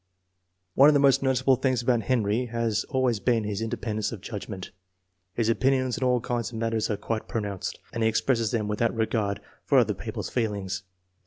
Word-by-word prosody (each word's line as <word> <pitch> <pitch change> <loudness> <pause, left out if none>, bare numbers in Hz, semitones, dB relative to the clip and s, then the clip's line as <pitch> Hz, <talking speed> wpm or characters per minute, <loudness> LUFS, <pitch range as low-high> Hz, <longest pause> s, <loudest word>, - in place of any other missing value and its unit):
One 140 +7 +7
of 150 - +4
the - - +5
most 140 -2 +4
noticeable 130 -1 +3
things 130 -2 0
about 120 -1 +2
Henry 115 +1 0
has 115 -2 -1
always 130 -4 0
been 115 0 +1
his 105 0 -3
independence 110 -1 -2
of 115 - -6
judgment. 100 -1 -7 0.6
His 115 -2 +1
opinions 130 +1 +2
on 130 - +1
all 125 -1 +3
kinds 120 -1 -2
of 115 - -6
matters 115 -1 -1
are 105 - -1
quite 110 +1 -3
pronounced, 100 -4 -3 0.2
and 115 - -3
he 110 - +4
expresses 115 0 +1
them 110 -3 -1
without 110 +3 0
regard 110 -3 -1 0.2
for - - +3
other - - +4
peo - - -7
ple's - - -4
feelings. 100 -5 -2
115 Hz, 190 wpm, -26 LUFS, 105-125 Hz, 0.6 s, One